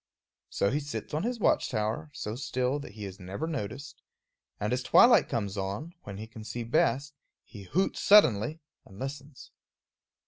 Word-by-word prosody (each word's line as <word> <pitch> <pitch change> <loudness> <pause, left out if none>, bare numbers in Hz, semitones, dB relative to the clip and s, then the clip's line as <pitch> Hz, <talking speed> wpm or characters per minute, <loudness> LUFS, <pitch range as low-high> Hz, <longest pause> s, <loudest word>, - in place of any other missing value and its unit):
So 100 - +1
he 145 - +1
sits 145 0 -6
on 155 - 0
his 240 +3 -2
watch - - +2
tower, 110 +7 -2
so 105 -5 -5
still 130 +1 -1
that 140 - -9
he 105 -1 -7
is 95 0 -8
never 95 - -5
noticed, 140 -3 -5 0.6
and 105 +3 -1
as 125 - 0
twilight 240 - +6
comes 100 -3 -2
on, 100 - -4
when 100 -1 -7
he 110 - -6
can 110 0 -11
see 120 +2 -5
best, 135 +4 +1 0.3
he 100 -5 -12
hoots 185 - 0
suddenly 155 - +5 0.2
and 95 - -15
listens. 135 +3 -7
125 Hz, 170 wpm, -29 LUFS, 105-145 Hz, 0.6 s, twilight